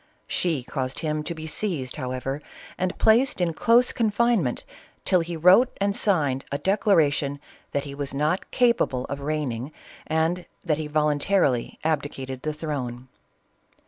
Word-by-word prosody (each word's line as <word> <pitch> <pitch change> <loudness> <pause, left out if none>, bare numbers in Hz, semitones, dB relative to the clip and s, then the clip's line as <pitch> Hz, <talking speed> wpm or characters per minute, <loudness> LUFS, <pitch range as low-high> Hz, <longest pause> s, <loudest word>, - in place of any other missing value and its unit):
She 160 -8 0
caused 130 +1 -4
him 155 -1 -1
to 170 - -4
be 160 0 -7
seized, 155 -6 -3
however, 130 +1 -3 0.3
and 185 0 -2
placed 230 +3 +4
in 175 -2 +1
close 235 +8 +4
confinement, 220 - +1 0.4
till 185 - +4
he 170 0 -3
wrote 185 +10 +5
and 200 0 +1
signed 145 -12 +1
a 140 - 0
declara 190 -3 +3
tion 145 -1 -2 0.3
that 140 - -1
he 140 - -7
was 140 -1 -4
not 150 +6 -1
capable 235 - +2
of 140 - -5
reigning 140 -3 -3 0.4
and 160 +3 0 0.2
that 155 -3 +1
he 155 - -3
voluntarily 150 -2 +1
abdicated 140 -4 -2
the 155 - -2
throne. 130 -5 -5
155 Hz, 145 wpm, -25 LUFS, 140-180 Hz, 0.4 s, wrote